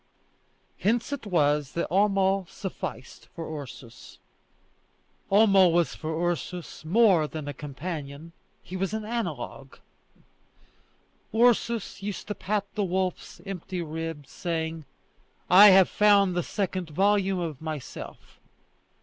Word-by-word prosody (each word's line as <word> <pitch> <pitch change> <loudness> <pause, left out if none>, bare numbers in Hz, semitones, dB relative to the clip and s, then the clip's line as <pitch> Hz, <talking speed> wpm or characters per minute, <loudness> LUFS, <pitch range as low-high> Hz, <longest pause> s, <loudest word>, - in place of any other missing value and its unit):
Hence 230 +6 0
it 265 -6 -5
was 150 -5 +1
that 170 - -1
Homo 195 0 +2
sufficed 185 -8 -7
for 160 -3 -5
Ursus. 125 -3 -12 1.1
Homo 195 -2 +6
was 170 -1 +2
for 160 +2 -2
Ursus 175 -1 -4
more 180 -2 +4
than 155 -1 -7
a 145 - -4
companion, 145 +1 -7 0.3
he 185 - -8
was 195 +3 -2
an 220 -1 -4
analogue. 170 - -5 1.6
Ursus 235 -3 +2
used 200 0 -5
to - - -1
pat 205 0 -2
the 210 - -1
wolf's 185 -1 -3
empty 185 -2 -5
ribs, 160 -2 -6
saying: 160 -2 -3 0.7
"I 195 +3 +10
have 190 -2 +7
found 200 -3 +4
the 175 - 0
second 185 -2 -3
volume 195 +3 +2
of 160 -6 -4
myself!" 155 -4 -8
180 Hz, 115 wpm, -27 LUFS, 160-200 Hz, 1.6 s, I